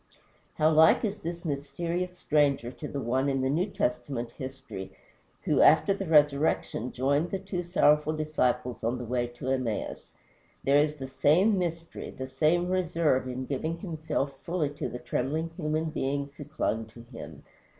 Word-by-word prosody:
How 155 +1 +3
like 160 +7 +6
is 210 0 -2
this 170 0 -6
mysterious 170 +5 -3
stranger 140 -7 +2
to 150 - -7
the 140 - -4
One 130 +3 0
in 135 -1 0
the 130 +1 +1
New 175 +7 +1
Testament 125 - -2
history 130 -7 -7 0.5
who - - +3
after 200 - +6
the 195 -1 -4
resurrection 145 -5 +2
joined 140 +6 +1
the 195 - -1
two 190 -1 -4
sorrowful 155 -3 +3
disciples 125 -5 0
on 120 +3 0
the 125 - -5
way 120 +1 0
to 120 +2 -6
Emmaus. 130 -5 -2 0.5
There 140 +1 +5
is 150 0 +2
the 135 -3 -6
same 160 +10 +3
mystery, 165 -1 -4
the 130 - -6
same 160 +6 +2
reserve 170 -7 +1
in 130 +1 -4
giving 155 +5 -2
himself 160 -5 -2
fully 165 -4 -1
to 145 - -4
the - - -5
trembling 150 +7 -2
human 155 -1 -1
beings 140 0 -2
who 145 - -8
clung 115 -7 -2
to 115 +1 -13
him. 115 - -10
145 Hz, 165 wpm, -28 LUFS, 130-165 Hz, 0.5 s, like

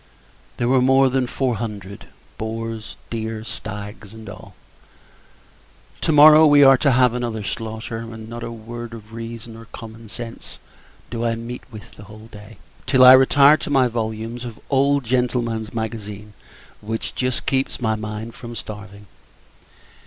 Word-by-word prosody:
There 120 - 0
were 130 0 +4
more 135 +1 +4
than 130 -1 +1
four 125 -2 -1
hundred; 100 -3 -7 0.3
boars, 115 0 -5
deer, 110 -1 -4
stags, 105 -1 -8
and 110 -1 -11
all. - - -11 1.5
To - - +1
morrow, 155 +1 +8
we 145 -1 +7
are 135 0 +8
to 140 -4 +3
have 125 -1 +4
another 120 -3 -3
slaughter; 110 +2 -5
and 115 -1 -8
not 120 +1 -7
a 115 - -5
word 115 +1 -8
of 110 0 -13
reason 115 0 -8
or 115 0 -12
common 115 -1 -11
sense 115 +1 -9 0.5
do 115 0 -3
I 115 -1 0
meet 115 +2 -7
with, 110 +1 -12
the 105 - -12
whole 110 +2 -13
day, 105 0 -13 0.3
till 130 -2 +5
I 130 0 +11
retire 140 +3 +6
to 145 - -6
my 135 -3 +4
volumes 115 +1 -4
of 120 -3 -7
the - - -20
old 140 +1 +3
Gentleman's 120 -2 -1
Magazine, 105 -2 -6 0.5
which 110 +2 -4
just 130 -1 -1
keeps 135 0 -1
my 110 -3 0
mind 110 +1 -5
from 120 -1 -9
starving. 105 -2 -9
115 Hz, 160 wpm, -21 LUFS, 110-125 Hz, 1.5 s, I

